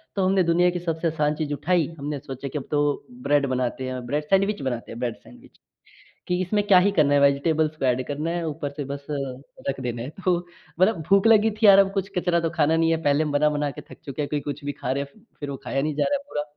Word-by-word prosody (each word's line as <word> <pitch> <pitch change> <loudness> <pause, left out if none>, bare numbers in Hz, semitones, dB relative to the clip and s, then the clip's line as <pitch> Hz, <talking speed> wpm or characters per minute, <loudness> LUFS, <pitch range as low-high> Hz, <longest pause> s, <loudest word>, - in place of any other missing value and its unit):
तो 195 -2 +1
हमने 190 0 +3
दुनिया 175 +1 +3
की 175 - -3
सबसे 165 -1 -2
आसान 150 -1 0
चीज़ 150 -2 -3
उठाई 160 +2 +1
हमने 145 0 -4
सोचा 135 -1 -7
कि 150 - -5
अब 135 - -6
तो 145 -1 0 0.2
ब्रेड 145 -1 +3
बनाते 130 +1 -2
हैं। 130 -1 -5
ब्रेड, 145 +5 -1
सैंडविच 195 +4 +1
बनाते 125 -3 -4
हैं। 115 - -8
ब्रेड 120 -2 -2
सैंडविच - - -18 0.7
की 180 - +1
इसमें 205 +3 0
क्या 195 - +7
ही 200 +3 +3
करना 150 -7 +3
है 145 - +5
वेज़िटेबल्स 150 +3 +2
को 135 - -2
एड 125 0 +2
करना 150 +3 -3
है 175 0 -2
ऊपर 145 -1 -4
से 145 0 -5
बस 140 +1 -6 0.6
रख 135 - -3
देना 120 -2 -3
है। 125 - -5 0.2
तो 180 -2 +3 0.4
मतलब 185 +1 +4
भूख 195 +2 +5
लगी 220 0 +5
थी 215 +1 0
यार! 200 -1 +9
अब 195 -1 +4
कुछ 195 -1 -2
कचरा 175 -1 +2
तो 165 -1 -1
खाना 160 -1 +2
नहीं 165 0 +2
है। 165 - +2
पहले 145 +2 +3
हम 150 - -2
बना-बना 150 0 +1
के - - -9
थक - - -14
चुके 140 +1 -4
हैं, 145 - -3
कोई 150 - -1
कुछ 145 0 -6
भी 145 - -1
खा 130 - -4
रहे 140 +1 -1
हैं 140 +9 -16 0.2
फ़िर 145 -1 -5
वो 135 - -4
खाया 135 - -1
नहीं 150 0 -2
जा 150 - +1
रहा 285 - +1
है 280 - -13
पूरा। 145 - -2
150 Hz, 265 wpm, -24 LUFS, 140-180 Hz, 0.7 s, यार